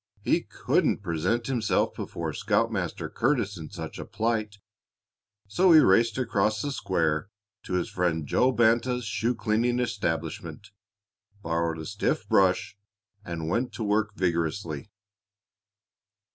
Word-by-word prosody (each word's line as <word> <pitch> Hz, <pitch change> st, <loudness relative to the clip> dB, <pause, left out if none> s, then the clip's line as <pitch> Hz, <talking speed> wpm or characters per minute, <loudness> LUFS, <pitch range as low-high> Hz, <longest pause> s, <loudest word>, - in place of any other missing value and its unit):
He -, -, +2 dB
couldn't -, -, 0 dB
present 90 Hz, +7 st, 0 dB
himself 120 Hz, -5 st, +1 dB
before -, -, -5 dB
Scoutmaster -, -, -1 dB
Curtis 115 Hz, -6 st, 0 dB
in 80 Hz, -3 st, -8 dB
such -, -, -7 dB
a -, -, -4 dB
plight, 110 Hz, -2 st, -2 dB, 0.9 s
so 180 Hz, -, +4 dB
he 160 Hz, -, +9 dB
raced 115 Hz, -1 st, +4 dB
across 110 Hz, -4 st, +1 dB
the 145 Hz, +6 st, -2 dB
square 80 Hz, -, 0 dB, 0.3 s
to -, -, -7 dB
his 90 Hz, -1 st, 0 dB
friend 85 Hz, -4 st, -1 dB
Joe 125 Hz, -, +3 dB
Banta's 120 Hz, +1 st, +2 dB
shoe 115 Hz, +4 st, -1 dB
cleaning 115 Hz, +3 st, +1 dB
establishment, 95 Hz, -2 st, -3 dB, 0.7 s
borrowed 85 Hz, 0 st, -1 dB
a 80 Hz, -, -6 dB
stiff -, -, -1 dB
brush, 95 Hz, +1 st, +2 dB, 0.5 s
and 85 Hz, -4 st, -5 dB
went 120 Hz, +9 st, -1 dB
to 115 Hz, -, -4 dB
work 105 Hz, 0 st, 0 dB
vigorously. 85 Hz, -3 st, -2 dB
105 Hz, 125 wpm, -27 LUFS, 85-115 Hz, 0.9 s, he